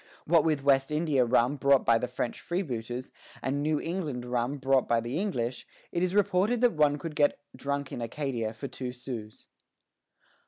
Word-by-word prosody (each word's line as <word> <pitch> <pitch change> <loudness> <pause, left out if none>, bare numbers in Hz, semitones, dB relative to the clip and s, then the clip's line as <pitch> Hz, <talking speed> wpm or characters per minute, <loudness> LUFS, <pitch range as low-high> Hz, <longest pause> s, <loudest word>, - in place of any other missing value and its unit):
What 165 -1 +4
with 155 -4 +1
West 135 -1 +4
India 150 -4 +2
rum 125 +3 +2
brought 140 0 +4
by 115 -1 +5
the 125 - -2
French 125 -1 -4
freebooters, 125 - -3 0.3
and 140 +2 0
New 150 0 +1
England 155 -8 -3
rum 125 +3 -1
brought 135 -1 +2
by 115 - +3
the 120 +7 -3
English, 125 - -2 0.2
it 170 - -1
is 185 +1 0
reported 205 +3 +3
that 245 -1 +4
one 150 -2 +3
could 155 +1 -6
get 145 -1 +3 0.2
drunk 140 -1 -3
in - - -5
Acadia 120 -2 -2
for 110 +5 -6
two 125 -1 -5
sous. 120 -4 -8
140 Hz, 180 wpm, -29 LUFS, 125-155 Hz, 0.3 s, by